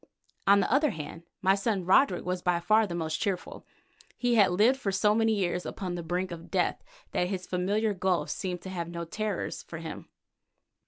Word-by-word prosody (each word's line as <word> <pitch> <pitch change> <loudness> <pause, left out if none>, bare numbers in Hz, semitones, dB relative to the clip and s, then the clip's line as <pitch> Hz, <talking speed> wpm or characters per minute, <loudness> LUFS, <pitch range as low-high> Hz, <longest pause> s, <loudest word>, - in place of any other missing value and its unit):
On 200 0 +7
the 220 - 0
other 295 +2 +4
hand, 165 - -7 0.2
my 190 0 +5
son 200 -2 -1
Roderick 185 0 +4
was 180 0 -2
by 175 -1 +1
far 215 +4 +3
the 170 - -4
most 160 -2 -2
cheerful. 190 -3 -3 0.5
He 245 -1 +1
had 205 -5 +6
lived 220 +9 +3
for 200 -6 -1
so 210 +2 +3
many 225 0 +2
years 180 -3 -1
upon 185 -3 -4
the 175 - -3
brink 180 +3 -2
of 170 -1 -8
death - - 0 0.3
that 180 - 0
this 185 -2 -3
familiar 205 +4 0
gulf 185 -2 0
seemed 185 -4 -4
to 190 - -6
have 170 -2 -4
no 170 0 -5
terrors 210 +2 -3
for 165 - -9
him. 165 0 -8
185 Hz, 200 wpm, -29 LUFS, 175-210 Hz, 0.5 s, On